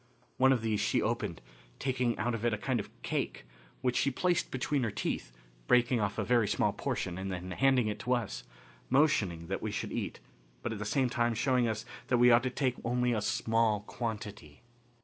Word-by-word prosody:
One 130 Hz, +1 st, +5 dB
of 125 Hz, -4 st, +2 dB
these 110 Hz, -2 st, 0 dB
she -, -, +2 dB
opened, 110 Hz, -6 st, -2 dB, 0.4 s
taking 125 Hz, -3 st, 0 dB
out 120 Hz, +2 st, 0 dB
of 115 Hz, -1 st, -3 dB
it 120 Hz, -2 st, +2 dB
a -, -, -7 dB
kind 125 Hz, +2 st, -1 dB
of 100 Hz, -, -5 dB
cake, -, -, -2 dB, 0.4 s
which 125 Hz, -1 st, +1 dB
she 140 Hz, -, +3 dB
placed 175 Hz, +6 st, 0 dB
between 135 Hz, +2 st, -1 dB
her 115 Hz, -, 0 dB
teeth, -, -, -3 dB, 0.4 s
breaking 120 Hz, 0 st, +4 dB
off 105 Hz, 0 st, -1 dB
a -, -, 0 dB
very 120 Hz, -4 st, +3 dB
small -, -, +1 dB
portion 90 Hz, 0 st, -3 dB
and 95 Hz, 0 st, -3 dB
then 90 Hz, 0 st, -5 dB
handing 130 Hz, +1 st, +3 dB
it 105 Hz, -, -3 dB
to 125 Hz, +1 st, 0 dB
us, 120 Hz, -4 st, -2 dB, 0.5 s
motioning 105 Hz, -, +2 dB
that 95 Hz, +3 st, -3 dB
we 110 Hz, -, -2 dB
should 105 Hz, -, -3 dB
eat, -, -, -3 dB, 0.4 s
but 120 Hz, -, -2 dB
at 105 Hz, -, -6 dB
the 105 Hz, -, -3 dB
same 130 Hz, +4 st, +2 dB
time 120 Hz, -1 st, +1 dB
showing 125 Hz, +1 st, +2 dB
us 110 Hz, 0 st, -2 dB, 0.2 s
that 125 Hz, -, +3 dB
we 120 Hz, 0 st, +6 dB
ought 120 Hz, +1 st, +6 dB
to 130 Hz, -, -1 dB
take 125 Hz, -1 st, -1 dB
only 125 Hz, +1 st, +1 dB
a 110 Hz, -, 0 dB
small 110 Hz, -1 st, +1 dB
quantity. 105 Hz, -, -6 dB
115 Hz, 210 wpm, -31 LUFS, 105-125 Hz, 0.5 s, we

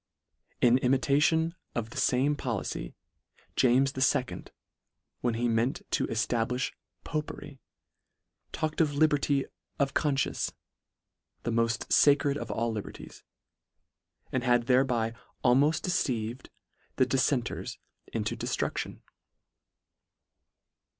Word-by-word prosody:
In 125 Hz, +1 st, +5 dB
imitation 145 Hz, +6 st, +2 dB, 0.2 s
of 115 Hz, -1 st, -3 dB
the -, -, -9 dB
fame 135 Hz, +4 st, +2 dB
policy, 115 Hz, -, -4 dB, 0.6 s
James 130 Hz, +2 st, +4 dB, 0.2 s
II. 130 Hz, -2 st, -3 dB, 0.7 s
when 120 Hz, -2 st, 0 dB
he 120 Hz, +1 st, 0 dB
meant 115 Hz, +3 st, 0 dB
to -, -, +1 dB
eftablifh 120 Hz, +3 st, 0 dB, 0.3 s
popery, 145 Hz, -3 st, -5 dB, 0.9 s
talk 155 Hz, -1 st, -2 dB
ed -, -, 0 dB
of 145 Hz, -3 st, +1 dB
liberty 145 Hz, -2 st, +2 dB, 0.3 s
of 140 Hz, -1 st, +1 dB
confcience, 140 Hz, -3 st, 0 dB, 0.9 s
the 120 Hz, -, -1 dB
moft 115 Hz, 0 st, +1 dB, 0.2 s
lacred 140 Hz, 0 st, +4 dB
of 120 Hz, -5 st, -5 dB
all 115 Hz, +2 st, -1 dB
liberties; 105 Hz, -2 st, -8 dB, 1.1 s
and -, -, -1 dB
had 120 Hz, -1 st, +3 dB
thereby 125 Hz, -3 st, +2 dB, 0.3 s
almoft 140 Hz, +6 st, +4 dB
de 180 Hz, -, -1 dB
ceived 120 Hz, -4 st, -1 dB, 0.5 s
the 130 Hz, -, +4 dB
diffenters 130 Hz, -1 st, 0 dB, 0.3 s
into -, -, -2 dB
deftrudlion. -, -, -3 dB
130 Hz, 105 wpm, -29 LUFS, 120-145 Hz, 1.1 s, In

